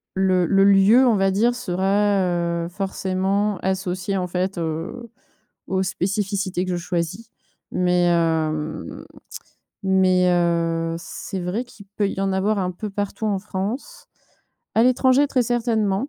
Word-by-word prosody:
le 185 Hz, -2 st, +2 dB
le 195 Hz, +2 st, +4 dB
lieu, 200 Hz, +6 st, +6 dB
on 230 Hz, -, +4 dB
va 195 Hz, -1 st, +2 dB
dire, 235 Hz, +5 st, +2 dB
sera, 200 Hz, -1 st, +1 dB, 0.5 s
heu, 170 Hz, -, -6 dB
forcément 195 Hz, +1 st, -1 dB
associé, 190 Hz, +1 st, -2 dB
en 180 Hz, -, -2 dB
fait, 185 Hz, +1 st, -2 dB
heu, 165 Hz, +9 st, -4 dB, 0.6 s
aux 190 Hz, 0 st, 0 dB
spécificités 195 Hz, 0 st, -1 dB
que 185 Hz, -, -3 dB
je 175 Hz, -, -1 dB
choisis. 175 Hz, +4 st, -3 dB, 0.4 s
Mais 180 Hz, -1 st, +2 dB
hem, 160 Hz, -2 st, -1 dB, 0.8 s
mais 185 Hz, -1 st, +3 dB
heu, 165 Hz, -1 st, +1 dB
c'est 190 Hz, +2 st, -6 dB
vrai 180 Hz, +7 st, -2 dB
qu'il 210 Hz, -4 st, -15 dB
peut 200 Hz, -2 st, +1 dB
y 195 Hz, -, -4 dB
en 195 Hz, 0 st, 0 dB
avoir 200 Hz, +2 st, +1 dB
un 180 Hz, -1 st, -1 dB
peu 210 Hz, +4 st, -6 dB
partout 205 Hz, +1 st, -4 dB
en 200 Hz, -2 st, 0 dB
France, 210 Hz, -, -5 dB, 0.7 s
à 225 Hz, -, +4 dB
l'étranger 260 Hz, +2 st, +4 dB
très 255 Hz, -3 st, +2 dB
certainement, 225 Hz, -1 st, 0 dB
190 Hz, 140 wpm, -22 LUFS, 180-210 Hz, 0.8 s, lieu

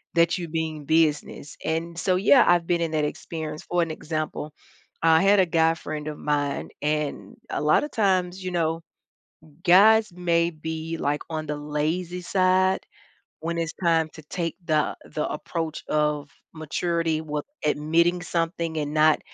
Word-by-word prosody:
that 170 Hz, +2 st, +3 dB
you 170 Hz, -2 st, -4 dB
being 160 Hz, -2 st, -3 dB
business, 150 Hz, -2 st, 0 dB
and 165 Hz, +1 st, -2 dB
so, 185 Hz, +2 st, +2 dB
yeah, 215 Hz, +7 st, +6 dB
I've 175 Hz, -1 st, +4 dB
been 170 Hz, 0 st, +1 dB
in 165 Hz, -1 st, -1 dB
that 155 Hz, -1 st, +1 dB
experience, 155 Hz, 0 st, -5 dB
for 175 Hz, 0 st, 0 dB
an 165 Hz, -, -4 dB
example, 155 Hz, -1 st, -4 dB, 0.5 s
I 160 Hz, 0 st, +5 dB
had 200 Hz, +1 st, +5 dB
a 185 Hz, -, +5 dB
guy 165 Hz, -1 st, +2 dB
friend 155 Hz, -2 st, -6 dB
of 150 Hz, -, -5 dB
mine, 145 Hz, -1 st, -1 dB
and 150 Hz, -1 st, -2 dB, 0.2 s
a -, -, -1 dB
lotta 155 Hz, -, +3 dB
times, 190 Hz, -5 st, 0 dB
you 185 Hz, -, -2 dB
know, 165 Hz, -1 st, 0 dB, 0.8 s
guys 215 Hz, +4 st, +6 dB
may 170 Hz, -1 st, +1 dB
be, 160 Hz, 0 st, -5 dB
like, 145 Hz, -1 st, -1 dB
on 155 Hz, -1 st, -3 dB
the 150 Hz, 0 st, -3 dB
lazy 160 Hz, +5 st, -2 dB
side 185 Hz, +1 st, +2 dB, 0.6 s
when 170 Hz, +1 st, -3 dB
it's 165 Hz, -1 st, -2 dB
time 165 Hz, -2 st, +3 dB
to 155 Hz, -, -11 dB
take 165 Hz, +1 st, -3 dB
the 155 Hz, -3 st, +1 dB
the 150 Hz, -, -3 dB
approach 160 Hz, +1 st, -4 dB
of 150 Hz, -1 st, 0 dB, 0.2 s
maturity 165 Hz, 0 st, -1 dB
with 150 Hz, -1 st, -4 dB, 0.2 s
admitting 165 Hz, +4 st, +2 dB
something 165 Hz, -1 st, -2 dB
and 150 Hz, -1 st, -2 dB
not 155 Hz, 0 st, +4 dB
165 Hz, 160 wpm, -25 LUFS, 155-175 Hz, 0.8 s, yeah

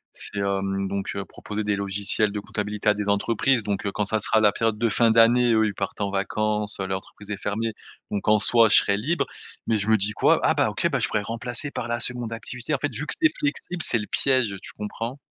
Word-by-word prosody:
C'est, 100 Hz, -, -3 dB
hem, 100 Hz, 0 st, -1 dB
donc 100 Hz, 0 st, -4 dB
heu, 100 Hz, -, -4 dB
proposer 105 Hz, 0 st, -6 dB
des 105 Hz, -1 st, 0 dB
logiciels 100 Hz, +1 st, +1 dB
de 105 Hz, -, -4 dB
comptabilité 105 Hz, +1 st, -4 dB
à 105 Hz, -, +6 dB
des 105 Hz, -1 st, -3 dB
entreprises 115 Hz, +4 st, +1 dB
donc 100 Hz, -2 st, -3 dB
heu, 100 Hz, -, -2 dB
quand 105 Hz, 0 st, -2 dB
ça 110 Hz, +2 st, +2 dB
sera 110 Hz, +2 st, +5 dB
la 105 Hz, -1 st, +5 dB
période 115 Hz, 0 st, -1 dB
de 115 Hz, +1 st, +1 dB
fin 115 Hz, +2 st, +2 dB
d'année, 115 Hz, +1 st, +4 dB
eux 110 Hz, 0 st, +3 dB
ils 105 Hz, -, -2 dB
partent 95 Hz, +1 st, -5 dB
en 100 Hz, -1 st, -1 dB
vacances, 105 Hz, +1 st, -1 dB
heu, 95 Hz, -, -2 dB
l'entreprise 95 Hz, +2 st, -6 dB
est -, -, -1 dB
fermée. 110 Hz, +3 st, -3 dB, 0.4 s
Donc 100 Hz, +1 st, -3 dB
en 105 Hz, 0 st, +5 dB
soi 115 Hz, +1 st, +4 dB
je -, -, +6 dB
serai 100 Hz, -, +4 dB
libre, 155 Hz, +11 st, -1 dB, 0.4 s
mais 110 Hz, -2 st, +1 dB
je 100 Hz, -, -3 dB
me 110 Hz, 0 st, +4 dB
dis 105 Hz, +2 st, -1 dB
quoi?: -, -, +3 dB
«Ah -, -, +3 dB
bah -, -, +1 dB
OK, -, -, -3 dB, 0.2 s
je -, -, +1 dB
pourrais 105 Hz, -1 st, -1 dB
remplacer 120 Hz, +6 st, -1 dB
par 120 Hz, -, -5 dB
la 120 Hz, 0 st, -2 dB
2de 120 Hz, -2 st, -3 dB
activité», 125 Hz, +5 st, -4 dB
en -, -, -1 dB
fait 140 Hz, -1 st, -3 dB
vu 145 Hz, +7 st, -5 dB
que -, -, +5 dB
c'est 315 Hz, -1 st, +4 dB
flexible, 165 Hz, +4 st, -3 dB
c'est 120 Hz, -, +6 dB
le 105 Hz, -, -4 dB
piège. 130 Hz, -7 st, +1 dB
Tu -, -, -9 dB
comprends? 115 Hz, +5 st, -5 dB
105 Hz, 245 wpm, -24 LUFS, 100-115 Hz, 0.4 s, à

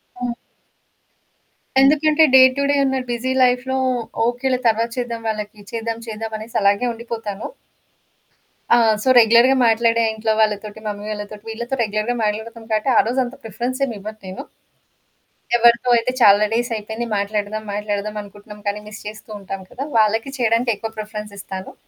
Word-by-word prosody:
హ్మ్. 245 Hz, -1 st, -6 dB, 1.5 s
ఎందుకంటే, 305 Hz, +3 st, +4 dB
day 265 Hz, -, +9 dB, 0.2 s
to 280 Hz, -, +1 dB
day -, -, +2 dB
ఉన్న 265 Hz, 0 st, 0 dB
బిజీ 240 Hz, +2 st, -2 dB
లైఫ్‌లో 250 Hz, +1 st, +1 dB, 0.5 s
ఓకేలే 250 Hz, +2 st, 0 dB
తర్వాత 230 Hz, +1 st, +2 dB
చేద్దాం 235 Hz, -2 st, -3 dB
వాళ్ళకి, 210 Hz, -1 st, -5 dB
చేద్దాం 230 Hz, 0 st, -3 dB
చేద్దామనేసి 220 Hz, +1 st, -6 dB
అలాగే 200 Hz, +4 st, +3 dB
ఉండిపోతాను. 225 Hz, -3 st, -6 dB, 1.3 s
ఆ! -, -, +7 dB, 0.3 s
సో, -, -, -4 dB
రెగ్యులర్‌గా 235 Hz, +3 st, +6 dB
మాట్లాడే 230 Hz, +1 st, +3 dB
ఇంట్లో 220 Hz, 0 st, 0 dB
వాళ్ళతోటి, 210 Hz, 0 st, -1 dB
మమ్మీ 205 Hz, 0 st, -5 dB
వాళ్ళతోటి 205 Hz, 0 st, -7 dB
వీళ్ళతో 235 Hz, +4 st, -4 dB
రెగ్యులర్‌గా 215 Hz, +3 st, -1 dB
మాట్లాడుతాం 220 Hz, +2 st, -3 dB
కాబట్టి 215 Hz, +5 st, +1 dB
ఆ -, -, +8 dB
రోజంతా 250 Hz, +1 st, -1 dB
ప్రిఫరెన్స్ 245 Hz, +5 st, -4 dB
ఏమి 235 Hz, -, -5 dB
ఇవ్వను 215 Hz, +2 st, -8 dB
నేను. 185 Hz, -, -7 dB, 1.1 s
ఎవ్వరితో 235 Hz, +1 st, +4 dB
అయితే 230 Hz, +2 st, 0 dB
చాలా 205 Hz, -1 st, +7 dB
డేసైపోయింది 230 Hz, -1 st, -2 dB
మాట్లాడదాం, 205 Hz, +1 st, -2 dB
మాట్లాడదాం 210 Hz, 0 st, -3 dB
అనుకుంటున్నాం 205 Hz, +1 st, -13 dB
కానీ, 205 Hz, +1 st, -1 dB
మిస్ 215 Hz, +1 st, -10 dB
చేస్తూ 215 Hz, +1 st, -10 dB
ఉంటాం 195 Hz, 0 st, -6 dB
కదా! 270 Hz, -, -5 dB
వాళ్ళకి 225 Hz, +4 st, +2 dB
చేయడానికి 235 Hz, 0 st, +2 dB
ఎక్కువ 225 Hz, +2 st, -6 dB
ప్రిఫరెన్స్ 210 Hz, -1 st, -6 dB
ఇస్తాను. 190 Hz, -1 st, -7 dB
225 Hz, 140 wpm, -20 LUFS, 210-240 Hz, 1.5 s, day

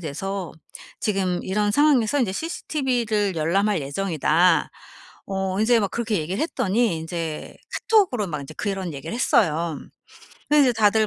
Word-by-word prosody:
돼서 185 Hz, +4 st, -4 dB, 0.5 s
지금 190 Hz, -4 st, 0 dB
이런 205 Hz, +2 st, 0 dB
상황에서 285 Hz, -1 st, +3 dB
인제 200 Hz, -6 st, 0 dB
CCTV를 240 Hz, -, -1 dB
열람 175 Hz, +7 st, +1 dB
할 200 Hz, -6 st, 0 dB
예정이다." 165 Hz, +2 st, +2 dB, 0.6 s
어 190 Hz, 0 st, -2 dB
이제 230 Hz, +2 st, +4 dB
막 200 Hz, -2 st, -1 dB
그렇게 230 Hz, -2 st, -1 dB
얘기를 175 Hz, +6 st, -3 dB
했더니 235 Hz, -, 0 dB
인제 165 Hz, -1 st, -5 dB, 0.3 s
카톡으로 360 Hz, -, +3 dB
막 150 Hz, -3 st, -4 dB
인제 140 Hz, -, -10 dB
그런 195 Hz, -5 st, -3 dB
얘기를 140 Hz, +10 st, -6 dB
했어요. 170 Hz, -, +1 dB, 0.7 s
그래서 295 Hz, -1 st, +5 dB
이제 -, -, 0 dB
다들 215 Hz, 0 st, +3 dB
195 Hz, 330 characters per minute, -23 LUFS, 170-225 Hz, 0.7 s, 그래서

